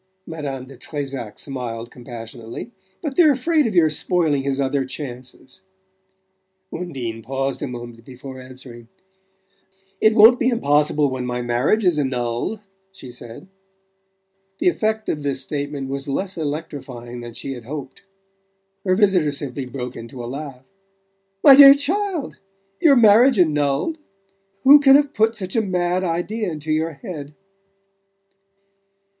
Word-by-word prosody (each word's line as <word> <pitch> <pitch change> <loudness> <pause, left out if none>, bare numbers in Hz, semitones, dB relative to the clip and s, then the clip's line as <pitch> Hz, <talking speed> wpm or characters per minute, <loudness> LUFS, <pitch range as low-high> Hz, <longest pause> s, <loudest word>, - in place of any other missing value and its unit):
Madame 140 -5 -6
de 135 +1 -13
Trezac 135 -7 -6
smiled 120 -4 -5
compassionately. 120 - -9 0.3
"But 290 -4 -3
they're 315 -5 +6
afraid 300 +2 +1
of 215 - -4
your 160 -3 +4
spoiling 155 -3 +1
his 135 0 -2
other 135 0 0
chances." 130 +3 -8 1.1
Undine 130 -10 -5
paused 135 +3 -3
a - - -2
moment 120 -2 -9
before 130 +1 -10
answering, 130 -2 -12 1.1
"It 220 0 +4
won't 225 +3 +7
be 245 - +2
impossible 150 - +2
when 125 -1 -4
my 125 0 -3
marriage 125 - +1
is 170 -4 +3
annulled," 125 - -2 0.3
she 135 -10 -11
said. 120 +6 -11 1.1
The 360 - +3
effect 220 -8 -1
of 150 - -2
this 140 -2 -2
statement 145 -1 -4
was 135 +1 -5
less 185 +7 -2
electrifying 145 -6 -6
than 120 -1 -9
she 135 +2 -5
had 120 -3 -10
hoped. 135 0 -8 0.8
Her 185 -1 +2
visitor 185 -7 +3
simply 140 -2 -5
broke 125 -1 -6
into 120 +2 -8
a - - -5
laugh. 135 0 -7 0.8
"My 275 - +10
dear 275 0 +10
child! 345 +2 -2 0.4
Your 295 -4 +5
marriage 235 +2 +6
annulled? 150 - +1 0.6
Who 285 +2 +9
can 275 -1 +6
have 285 0 +3
put 225 +1 +2
such 190 -1 -5
a 225 - +3
mad 180 -2 -1
idea 185 +4 -2
into 155 0 -5
your 160 +1 0
head?" 145 0 -9
145 Hz, 140 wpm, -21 LUFS, 130-200 Hz, 1.1 s, My